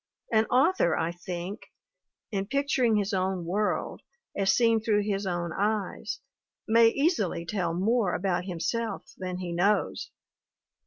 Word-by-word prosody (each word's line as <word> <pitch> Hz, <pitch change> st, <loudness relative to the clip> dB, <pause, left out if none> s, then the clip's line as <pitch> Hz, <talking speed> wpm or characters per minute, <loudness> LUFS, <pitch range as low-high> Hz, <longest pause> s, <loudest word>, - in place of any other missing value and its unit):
An 220 Hz, -1 st, +4 dB
author, 260 Hz, -, +3 dB
I 165 Hz, +1 st, 0 dB
think, 175 Hz, +3 st, -6 dB, 0.7 s
in 195 Hz, -2 st, -2 dB
picturing 275 Hz, -3 st, +2 dB
his 205 Hz, 0 st, 0 dB
own 185 Hz, -2 st, -1 dB
world, 205 Hz, +5 st, -1 dB, 0.3 s
as 195 Hz, -1 st, +3 dB
seen 230 Hz, 0 st, +3 dB
through 210 Hz, -1 st, +2 dB
his 200 Hz, -1 st, -2 dB
own 175 Hz, -2 st, -2 dB
eyes, 215 Hz, +3 st, -2 dB, 0.5 s
may 230 Hz, +1 st, +6 dB
easily 225 Hz, -, +1 dB
tell 175 Hz, -3 st, -1 dB
more 205 Hz, +1 st, +1 dB
about 180 Hz, -1 st, -1 dB
him 180 Hz, -3 st, -5 dB
self 230 Hz, +2 st, -3 dB
than 185 Hz, -1 st, -4 dB
he 180 Hz, -1 st, -4 dB
knows. 200 Hz, +5 st, +1 dB
200 Hz, 140 wpm, -28 LUFS, 180-225 Hz, 0.7 s, may